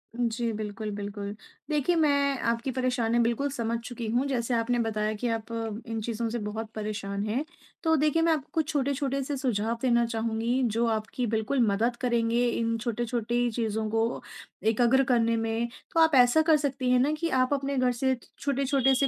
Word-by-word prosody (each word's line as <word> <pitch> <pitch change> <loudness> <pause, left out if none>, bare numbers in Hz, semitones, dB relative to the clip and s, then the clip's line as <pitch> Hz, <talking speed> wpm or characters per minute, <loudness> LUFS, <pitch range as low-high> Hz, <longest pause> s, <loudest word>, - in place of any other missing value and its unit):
जी। 235 -1 -1
बिल्कुल, 210 0 -4
बिल्कुल 205 0 -5 0.3
देखिए, 305 +3 +1
मैं 280 -3 +2
आपकी 235 +3 -1
परेशानियाँ 245 -2 +1
बिल्कुल 240 +5 0
समझ 235 -3 -1
चुकी 235 -1 -5
हूँ 245 +4 +1
जैसे 245 -2 -1
आपने 235 +1 +1
बताया 215 -1 0
कि 240 +3 -3
आप 220 - -12 0.4
इन 225 -1 -3
चीज़ों 230 +1 -2
से 235 +1 -3
बहुत 215 +1 -4
परेशान 205 -2 -3
हैं। 250 +8 0 0.4
तो 320 -1 +4
देखिए, 305 +2 +2
मैं 330 0 +3
आपको 300 -1 -4
कुछ 315 -2 0
छोटे-छोटे 275 -1 0
से 285 +2 -3
सुझाव 230 -3 -1
देना 235 -2 +3
चाहूँगी 230 +2 -1
जो 235 - +2
आपकी 225 +2 -1
बिल्कुल 220 +5 0
मदद 225 +5 +1
करेंगे 235 -1 +2
इन 230 -1 0
छोटे-छोटी 240 +1 -1
चीज़ों 220 -1 -1
को 225 +2 0 0.5
एकग्र 245 +4 +4
करने 230 -1 +3
में। 225 +1 -1 0.3
तो 330 - +2
आप 320 -3 +5
ऐसा 250 +5 +6
कर 315 -1 +4
सकती 275 -3 -1
हैं 250 - +5
ना 275 +4 +3
कि, 330 +2 -1
आप 255 +1 +2
अपने 275 0 -1
घर 255 -1 +3
से 260 +2 +1 0.2
छोटे-छोटे 275 -1 +2
से 275 +2 +3
240 Hz, 180 wpm, -27 LUFS, 225-270 Hz, 0.5 s, ऐसा